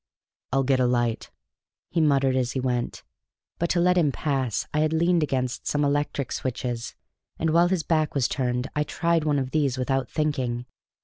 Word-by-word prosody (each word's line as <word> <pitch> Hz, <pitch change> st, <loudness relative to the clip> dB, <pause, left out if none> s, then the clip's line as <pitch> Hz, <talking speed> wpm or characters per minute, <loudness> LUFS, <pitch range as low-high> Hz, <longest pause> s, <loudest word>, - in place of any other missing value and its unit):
"I'll 135 Hz, +1 st, +2 dB
get 135 Hz, 0 st, +2 dB
a 125 Hz, -, +3 dB
light," 120 Hz, -2 st, 0 dB, 0.6 s
he 170 Hz, -, +1 dB
muttered 135 Hz, -3 st, +3 dB
as 125 Hz, -1 st, 0 dB
he 130 Hz, -, -1 dB
went; 125 Hz, -2 st, -2 dB, 0.6 s
but 170 Hz, -, 0 dB
to 175 Hz, -, +2 dB
let 180 Hz, +1 st, +4 dB
him 150 Hz, -4 st, +3 dB
pass 135 Hz, -7 st, -1 dB
I 150 Hz, -, +1 dB
had 155 Hz, +1 st, +2 dB
leaned 170 Hz, +1 st, +3 dB
against 130 Hz, -4 st, -2 dB
some 145 Hz, 0 st, +1 dB
electric 145 Hz, -2 st, -1 dB
switches, 120 Hz, -2 st, -3 dB, 0.4 s
and 160 Hz, -1 st, 0 dB
while 170 Hz, +2 st, +5 dB
his 180 Hz, -3 st, 0 dB
back 155 Hz, -1 st, 0 dB
was 135 Hz, -3 st, +2 dB
turned 125 Hz, -1 st, -1 dB
I 150 Hz, -, +1 dB
tried 165 Hz, +1 st, 0 dB
one 150 Hz, -2 st, +2 dB
of 130 Hz, -1 st, -2 dB
these 140 Hz, -5 st, +1 dB
without 135 Hz, +1 st, -1 dB
thinking. 130 Hz, -6 st, -1 dB
140 Hz, 185 wpm, -25 LUFS, 125-155 Hz, 0.6 s, while